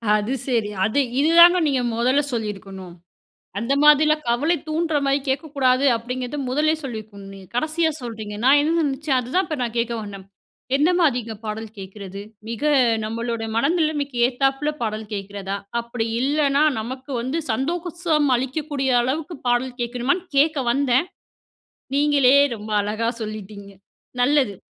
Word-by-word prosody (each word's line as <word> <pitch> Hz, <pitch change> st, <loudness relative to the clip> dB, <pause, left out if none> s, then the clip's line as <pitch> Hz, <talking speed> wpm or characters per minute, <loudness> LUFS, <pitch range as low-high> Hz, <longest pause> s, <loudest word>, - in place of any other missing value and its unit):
அது 215 Hz, +5 st, -1 dB
சரி. 230 Hz, -5 st, 0 dB, 0.2 s
அது 220 Hz, +7 st, +1 dB, 0.2 s
இதுதாங்க 340 Hz, +4 st, +7 dB
நீங்க 265 Hz, -3 st, +1 dB, 0.2 s
முதல்ல 255 Hz, +5 st, +3 dB
சொல்லியிருக்கணும். 195 Hz, -5 st, -5 dB, 0.7 s
"அந்த 230 Hz, +5 st, -1 dB
மாதிரிலாம் 305 Hz, 0 st, +5 dB
கவலை 295 Hz, +9 st, +2 dB
தூண்டுறமாரி 300 Hz, -4 st, +1 dB
கேட்கக்கூடாது" 270 Hz, -2 st, +1 dB
அப்பிடிங்கிறத 250 Hz, +4 st, -5 dB
முதல்லே 305 Hz, +4 st, +2 dB
சொல்லியிருக்கணும் 210 Hz, -5 st, -8 dB
நீங்க. 190 Hz, -2 st, -13 dB
கடைசியா 315 Hz, +4 st, +1 dB
சொல்றீங்க. 220 Hz, -3 st, -6 dB
நான் 280 Hz, +2 st, +6 dB
என்ன 320 Hz, +2 st, +1 dB
நெனைச்சேன் 275 Hz, -1 st, 0 dB
அதுதான் 335 Hz, +10 st, -1 dB
இப்ப 310 Hz, -3 st, -4 dB
நான் 235 Hz, -1 st, -3 dB
கேட்க 235 Hz, 0 st, 0 dB
வந்தேன். 200 Hz, -2 st, -9 dB, 0.5 s
எந்தமாரிங்க 285 Hz, -8 st, +1 dB
பாடல் 220 Hz, +1 st, -5 dB
கேட்குறது? 195 Hz, 0 st, -8 dB, 0.3 s
மிக 230 Hz, +4 st, -6 dB, 0.4 s
நம்மளோட 230 Hz, +1 st, -3 dB
மனநிலைமைக்கு 295 Hz, -1 st, 0 dB
ஏத்தாப்ல 270 Hz, +3 st, 0 dB
பாடல் 215 Hz, -1 st, -3 dB
கேட்கிறதா? 200 Hz, 0 st, -4 dB, 0.2 s
அப்படி 235 Hz, -1 st, -4 dB
இல்லன்னா, 285 Hz, +1 st, +2 dB, 0.2 s
நமக்கு 260 Hz, +5 st, -7 dB
வந்து 260 Hz, +7 st, -2 dB
சந்தோஷம் 330 Hz, +4 st, 0 dB
அளிக்கக்கூடிய 270 Hz, +1 st, -2 dB
அளவுக்கு 300 Hz, +7 st, -3 dB
பாடல் 245 Hz, +1 st, 0 dB
கேட்கணுமான்னு 250 Hz, +9 st, -1 dB
கேட்க 300 Hz, +1 st, +3 dB
வந்தேன். 270 Hz, +4 st, +2 dB, 0.9 s
நீங்களே 280 Hz, -2 st, +4 dB, 0.2 s
ரொம்ப 215 Hz, 0 st, -8 dB
அழகா 215 Hz, +3 st, -2 dB
சொல்லிட்டீங்க. 210 Hz, -2 st, -7 dB, 0.5 s
நல்லது. 260 Hz, -6 st, +2 dB
255 Hz, 125 wpm, -22 LUFS, 220-295 Hz, 0.9 s, இதுதாங்க